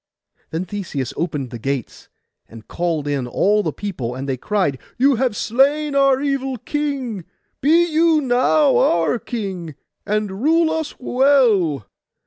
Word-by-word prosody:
Then 165 +3 -3
Theseus 170 - -4
opened 150 -6 -3
the 120 - -7
gates, 135 0 -4 0.4
and 115 -1 -13
called 165 -4 -2
in 140 -4 -1
all 205 - +2
the - - -2
people; 135 - -5
and 135 +2 -5
they 135 - -1
cried, 165 - -1 0.2
'You 270 0 +3
have 250 -3 0
slain 285 +7 +1
our 275 -1 +4
evil 270 -2 -2
king; 270 - -3 0.4
be 330 +5 +4
you 325 -1 +3
now 270 +2 +3
our 170 +8 +2
king, 190 - -5 0.3
and 210 -1 -2
rule 320 +3 +3
us 320 -1 -3
well. 245 - +2
215 Hz, 140 wpm, -20 LUFS, -, 0.4 s, our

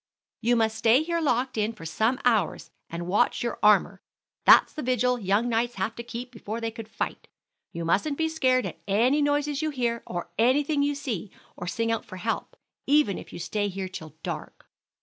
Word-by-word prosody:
"You 240 +1 +3
must 220 -1 +1
stay 235 +7 +5
here 335 +1 -1
locked 255 -4 0
in 215 +2 0
for 200 -7 -11
some 220 - 0
hours, 220 -8 +1 0.2
and 170 +1 -5
watch 190 +6 +1
your 235 - -3
armor. 210 -1 +4 0.4
That's - - +7
the 305 - -5
vigil 250 -1 +1
young 205 +3 +1
knights 235 +1 0
had 195 +4 -2
to - - -4
keep 240 +1 -7
before 225 -1 -6
they 230 -1 -3
could 225 -1 -8
fight. - - -4 0.4
You 170 0 -5
mustn't 275 - +1
be 320 - +1
scared 260 -6 +2
at - - -6
any 240 +9 +3
noises 290 0 +1
you 310 - 0
hear, 240 -5 -1
or 175 -1 -5
anything 285 +5 +3
you 285 0 +1
see, 230 - -4 0.3
or 175 - -7
sing 230 +5 -1
out 225 - -1
for 185 - -9
help, 225 - -3 0.3
even 285 -8 +3
if - - -12
you - - -8
stay 205 +4 -1
here 190 -1 -4
till 160 -4 -9
dark. - - -6
235 Hz, 200 wpm, -26 LUFS, 205-265 Hz, 0.4 s, That's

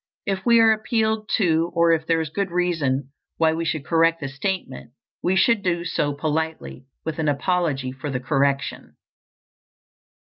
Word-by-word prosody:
If 195 -2 -2
we 235 -1 +6
are 225 -1 +6
appealed 220 0 0
to, 165 -4 +1
or 170 0 +4
if 160 -1 0
there 165 -1 +2
is 155 -2 -5
good 200 +2 -2
reason 155 -7 -1 0.3
why 160 -1 +3
we 165 +1 -2
should 155 -3 -2
correct 165 0 +3
the 135 - -4
statement, 135 -4 -4 0.3
we 185 - +1
should 220 +3 +3
do 175 -2 -1
so 145 -4 0
politely, 150 - -3 0.2
with 160 0 -4
an 155 - 0
apology 145 -3 0
for 135 +3 -6
the 130 -2 -2
correction. 140 +1 -1
165 Hz, 165 wpm, -23 LUFS, 145-180 Hz, 0.3 s, we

